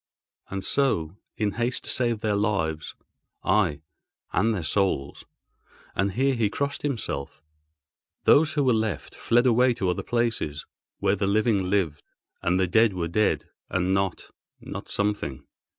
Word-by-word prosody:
And 95 Hz, -1 st, -4 dB
so, 95 Hz, -, +1 dB, 0.2 s
in 105 Hz, -2 st, +1 dB
haste 120 Hz, +3 st, -1 dB
to -, -, -3 dB
save 120 Hz, -4 st, 0 dB
their 105 Hz, -2 st, +1 dB
lives 95 Hz, -7 st, -1 dB, 0.5 s
(aye, 90 Hz, -8 st, +2 dB, 0.5 s
and 110 Hz, +4 st, +3 dB
their 95 Hz, -6 st, -2 dB
souls!—and 95 Hz, +3 st, -3 dB
here 135 Hz, +4 st, +2 dB
he 115 Hz, -4 st, +1 dB
crossed 140 Hz, +6 st, -2 dB
himself) 110 Hz, -, -3 dB, 0.8 s
those 155 Hz, +1 st, +5 dB
who 145 Hz, -, +2 dB
were 130 Hz, -2 st, +4 dB
left 110 Hz, -7 st, -2 dB
fled 120 Hz, +2 st, +2 dB
away 125 Hz, 0 st, +4 dB
to 95 Hz, -4 st, 0 dB
other -, -, -2 dB
places, 115 Hz, -11 st, -1 dB, 0.3 s
where 95 Hz, -, +2 dB
the 100 Hz, 0 st, -1 dB
living 100 Hz, -2 st, +2 dB
lived, 90 Hz, -7 st, 0 dB, 0.4 s
and 90 Hz, +2 st, +1 dB
the 95 Hz, -, +3 dB
dead 110 Hz, +3 st, +4 dB
were 85 Hz, -2 st, -2 dB
dead 105 Hz, +5 st, +1 dB, 0.2 s
and 95 Hz, 0 st, +1 dB
not—not 95 Hz, -2 st, -5 dB
something. 100 Hz, -11 st, -2 dB
100 Hz, 140 wpm, -26 LUFS, 90-115 Hz, 0.8 s, those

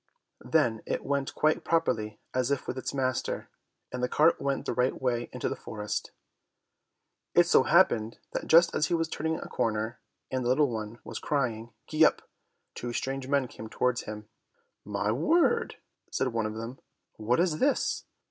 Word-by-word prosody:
Then 120 Hz, -9 st, +2 dB
it -, -, -2 dB
went 140 Hz, -1 st, -1 dB
quite 155 Hz, +1 st, +2 dB
properly 110 Hz, -10 st, 0 dB
as 130 Hz, 0 st, +1 dB
if 140 Hz, -1 st, -1 dB
with -, -, -2 dB
its 130 Hz, -, -3 dB
master, 130 Hz, -2 st, -2 dB, 0.4 s
and 125 Hz, -, -4 dB
the 125 Hz, -, 0 dB
cart 155 Hz, +3 st, +4 dB
went 140 Hz, -1 st, -1 dB
the -, -, -1 dB
right 125 Hz, +2 st, +1 dB
way 120 Hz, -2 st, -1 dB
into -, -, -3 dB
the -, -, -2 dB
forest. 105 Hz, -1 st, -4 dB, 1.3 s
It -, -, +7 dB
so -, -, +5 dB
happened 110 Hz, 0 st, +3 dB, 0.2 s
that -, -, -3 dB
just 170 Hz, +2 st, +6 dB
as 150 Hz, -, +2 dB
he 175 Hz, -, +1 dB
was 165 Hz, -1 st, 0 dB
turning 160 Hz, 0 st, -2 dB
a -, -, -7 dB
corner, 110 Hz, +1 st, -1 dB, 0.3 s
and 130 Hz, -1 st, -1 dB
the 120 Hz, -, 0 dB
little 140 Hz, +1 st, +3 dB
one 110 Hz, 0 st, -5 dB
was -, -, -6 dB
crying, 120 Hz, -5 st, -1 dB
"Gee 155 Hz, +1 st, +3 dB
up," -, -, +4 dB, 0.5 s
two 120 Hz, 0 st, -5 dB
strange 135 Hz, +1 st, -3 dB
men 140 Hz, -2 st, +2 dB
came 110 Hz, -2 st, -9 dB
towards 125 Hz, +1 st, 0 dB
him. 105 Hz, 0 st, -7 dB, 0.6 s
"My 105 Hz, +1 st, -1 dB
word!" 340 Hz, -, +2 dB, 0.4 s
said 135 Hz, -, 0 dB
one 115 Hz, -2 st, -1 dB
of 110 Hz, -, -6 dB
them, 115 Hz, +4 st, -6 dB, 0.4 s
"What 115 Hz, +5 st, +1 dB
is 170 Hz, -3 st, +2 dB
this? 280 Hz, +1 st, +1 dB
125 Hz, 175 wpm, -29 LUFS, 115-145 Hz, 1.3 s, It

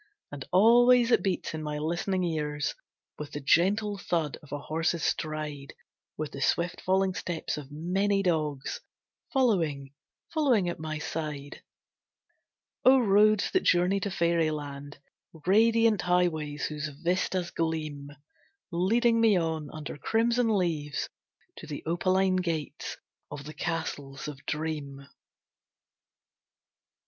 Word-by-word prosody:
And 145 Hz, -2 st, -6 dB
always 240 Hz, +5 st, +6 dB
it -, -, +5 dB
beats 190 Hz, -5 st, -2 dB
in 155 Hz, -, -4 dB
my 150 Hz, -1 st, -3 dB
listening 175 Hz, +5 st, -1 dB
ears 150 Hz, -3 st, -1 dB, 0.5 s
With 150 Hz, -1 st, -7 dB
the 145 Hz, -, -3 dB
gentle 200 Hz, +8 st, +2 dB
thud 165 Hz, -5 st, -1 dB
of 150 Hz, -, -17 dB
a 145 Hz, -, -2 dB
horse's 165 Hz, +2 st, -1 dB
stride, 150 Hz, -3 st, -3 dB, 0.4 s
With 155 Hz, -1 st, -4 dB
the 140 Hz, -, -7 dB
swift 170 Hz, +5 st, 0 dB
falling 190 Hz, 0 st, +2 dB
steps 175 Hz, -3 st, -3 dB
of 145 Hz, -3 st, -8 dB
many 195 Hz, +6 st, 0 dB
dogs, 155 Hz, -6 st, -1 dB, 0.5 s
Following, 165 Hz, -, +1 dB, 0.4 s
following 260 Hz, -, +3 dB
at 170 Hz, -, -5 dB
my 155 Hz, -1 st, -4 dB
side. 150 Hz, -2 st, -5 dB, 1.2 s
O 265 Hz, +1 st, +7 dB
Roads 215 Hz, -2 st, +4 dB
that 375 Hz, -, +2 dB
journey 180 Hz, +3 st, +3 dB
to 200 Hz, -, -2 dB
fairyland! 155 Hz, -5 st, -1 dB, 0.5 s
Radiant 225 Hz, +1 st, +4 dB
highways 165 Hz, -5 st, 0 dB
whose 150 Hz, 0 st, -3 dB
vistas 175 Hz, +4 st, -1 dB
gleam, 155 Hz, -3 st, -3 dB, 0.6 s
Leading 230 Hz, +7 st, +2 dB
me 220 Hz, -4 st, +5 dB
on, 160 Hz, -3 st, -2 dB
under 150 Hz, -2 st, -7 dB
crimson 230 Hz, +6 st, +1 dB
leaves, 155 Hz, -5 st, -1 dB, 0.5 s
To 160 Hz, -, -9 dB
the 150 Hz, -2 st, -6 dB
opaline 185 Hz, +3 st, +2 dB
gates 165 Hz, -4 st, -3 dB, 0.3 s
of 145 Hz, -1 st, -7 dB
the 155 Hz, +2 st, -8 dB
Castles 150 Hz, -5 st, -4 dB
of 145 Hz, -1 st, -8 dB
Dream. 150 Hz, -3 st, -4 dB
165 Hz, 120 wpm, -28 LUFS, 150-195 Hz, 1.2 s, O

